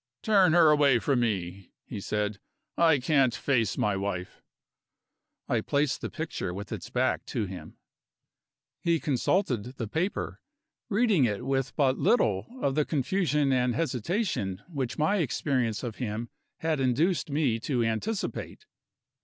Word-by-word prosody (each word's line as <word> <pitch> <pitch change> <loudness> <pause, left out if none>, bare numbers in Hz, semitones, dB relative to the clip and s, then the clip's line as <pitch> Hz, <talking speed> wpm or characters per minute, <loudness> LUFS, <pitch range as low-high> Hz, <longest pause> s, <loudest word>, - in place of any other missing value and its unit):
"Turn 195 -6 +5
her 165 -3 +6
away 145 -4 +5
from 130 +2 +1
me," 95 -5 -2
he - - -6
said; 105 0 -2 0.4
"I 165 -3 +5
can't 135 -2 +2
face 120 -7 0
my 105 -1 +1
wife." 95 -2 -4 1.1
I - - +1
placed 145 -1 0
the - - -3
picture 160 - -4
with 100 +1 -7
its - - -6
back 125 +1 0
to 115 -5 -2
him. 95 -1 -9 1.0
He 170 -1 +2
consulted 130 - 0
the 115 - -3
paper, 165 - -2 0.5
reading 205 - +3
it 110 +2 -2
with 135 -1 -1
but 135 -3 +2
little 105 - +2 0.2
of 135 - +2
the 150 +2 +2
confusion 150 -1 +1
and 125 -2 +1
hesitation 130 - -1
which 135 -8 -3
my 160 +7 +2
experience 130 - 0
of 115 -3 -5
him 115 -1 -4 0.3
had 160 -2 0
induced 150 +7 +1
me 140 -6 +1
to 120 0 0
anticipate. 190 - -3
130 Hz, 140 wpm, -28 LUFS, 115-160 Hz, 1.1 s, her